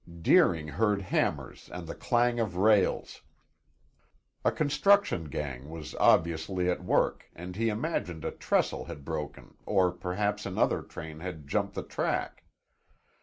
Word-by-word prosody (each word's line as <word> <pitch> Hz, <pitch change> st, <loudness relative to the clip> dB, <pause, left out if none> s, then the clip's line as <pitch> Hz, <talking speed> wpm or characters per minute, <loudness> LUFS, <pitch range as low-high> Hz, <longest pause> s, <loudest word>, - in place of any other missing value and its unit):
Deering 80 Hz, -3 st, +4 dB
heard 105 Hz, +5 st, +1 dB
hammers 95 Hz, -, -2 dB
and 90 Hz, -1 st, -6 dB
the 80 Hz, -, -6 dB
clang 120 Hz, -1 st, +1 dB
of 105 Hz, -6 st, -1 dB
rails. 100 Hz, +1 st, +2 dB, 1.2 s
A -, -, +3 dB
construction 155 Hz, -, +3 dB
gang 70 Hz, -2 st, -5 dB
was 80 Hz, -3 st, -8 dB
obviously 85 Hz, +3 st, +2 dB
at 90 Hz, -, -3 dB
work 90 Hz, -, +1 dB
and 90 Hz, +2 st, -8 dB
he 115 Hz, +2 st, +1 dB
imagined 105 Hz, -, -3 dB
a -, -, -1 dB
trestle -, -, 0 dB
had 70 Hz, -, -9 dB
broken 75 Hz, -2 st, -5 dB
or 95 Hz, -3 st, +2 dB
perhaps 100 Hz, +4 st, -2 dB
another 95 Hz, -, +1 dB
train 80 Hz, -1 st, -9 dB
had 80 Hz, -4 st, -7 dB
jumped -, -, -1 dB
the -, -, -3 dB
track. -, -, -2 dB
90 Hz, 135 wpm, -29 LUFS, 80-105 Hz, 1.2 s, Deering